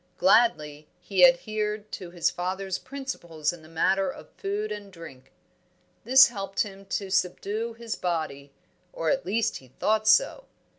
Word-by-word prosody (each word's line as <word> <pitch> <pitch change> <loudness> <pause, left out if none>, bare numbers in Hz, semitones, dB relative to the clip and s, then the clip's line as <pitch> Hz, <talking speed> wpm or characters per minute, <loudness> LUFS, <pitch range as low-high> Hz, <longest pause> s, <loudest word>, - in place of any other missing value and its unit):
Gladly 155 -8 +2
he 185 0 +1
adhered 210 +4 +2
to 180 - -7
his 175 -1 0
father's 185 +1 -3
principles 175 - -4
in 175 - -12
the 155 - -16
matter 190 +4 +1
of - - -10
food 210 +2 -4
and 205 -1 -7
drink; 135 -7 -13 0.7
this 265 +2 +8
helped 195 -3 -3
him 195 -2 -5
to 195 0 -3
subdue 200 +5 -1
his 230 -1 -5
body, 155 -5 -3 0.4
or 165 - -1
at 270 -8 -1
least 220 +3 0
he 130 - -16
thought 215 - 0
so. - - +4
195 Hz, 150 wpm, -26 LUFS, 170-215 Hz, 0.7 s, this